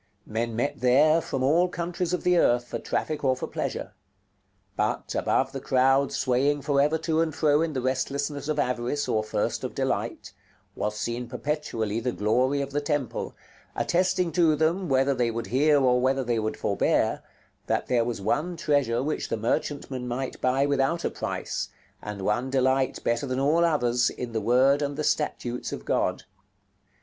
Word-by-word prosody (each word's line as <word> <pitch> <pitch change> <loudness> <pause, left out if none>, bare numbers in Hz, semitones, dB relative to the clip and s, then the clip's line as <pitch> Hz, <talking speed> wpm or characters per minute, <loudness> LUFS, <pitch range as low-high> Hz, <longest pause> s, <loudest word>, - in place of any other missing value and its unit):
Men 115 +1 -3
met 125 +5 -1
there 150 +6 +5
from 135 -4 -3
all 165 +7 +4
countries 175 0 -3
of 180 - -1
the 180 0 +3
earth, 120 -7 +3
for - - -4
traffic 155 -1 -2
or 130 -1 +3
for 130 - -4
pleasure; - - -4 0.8
but, - - -1
above - - +1
the - - -5
crowd 135 +1 +2
swaying 140 +2 +1
for 140 -1 +2
ever 150 +3 +2
to 160 0 0
and 160 -3 -1
fro 150 -1 +3
in 165 -1 -1
the 130 -3 -2
restlessness 140 +2 -2
of 155 -1 -1
avarice 125 +1 -1
or 110 - +1
thirst 110 - -2
of - - -5
delight, - - -2 0.4
was 105 +1 -2
seen 120 +2 -3
perpetually 120 -8 -2
the 125 +2 -1
glory 125 +7 +1
of 140 0 -4
the 145 +1 -1
temple, 145 -4 -2 0.4
attesting 180 -1 +1
to 165 -3 +3
them, 165 +4 0
whether 135 +1 +3
they 125 -2 +1
would 115 0 -3
hear 145 +7 +3
or 125 -2 +3
whether 135 +1 +1
they 120 -2 0
would 110 0 -2
forbear, - - +1 0.5
that - - 0
there 120 -2 +2
was 115 -2 -3
one 150 - -1
treasure 140 -7 +1
which 155 +2 -2
the - - -1
merchantmen 125 +2 -2
might 125 +2 -4
buy 130 +2 +2
without 140 +4 0
a - - 0
price, - - -4 0.3
and 105 -2 -6
one 120 +6 0
delight 130 0 +1
better 120 +5 0
than 130 0 -1
all 155 +5 +3
others, 125 -7 +2
in 125 -1 -6
the 110 -1 -2
word 130 +6 +4
and 145 0 -2
the 155 - -1
statutes 125 -5 -1
of - - -6
God. - - 0
135 Hz, 180 wpm, -26 LUFS, 125-150 Hz, 0.8 s, there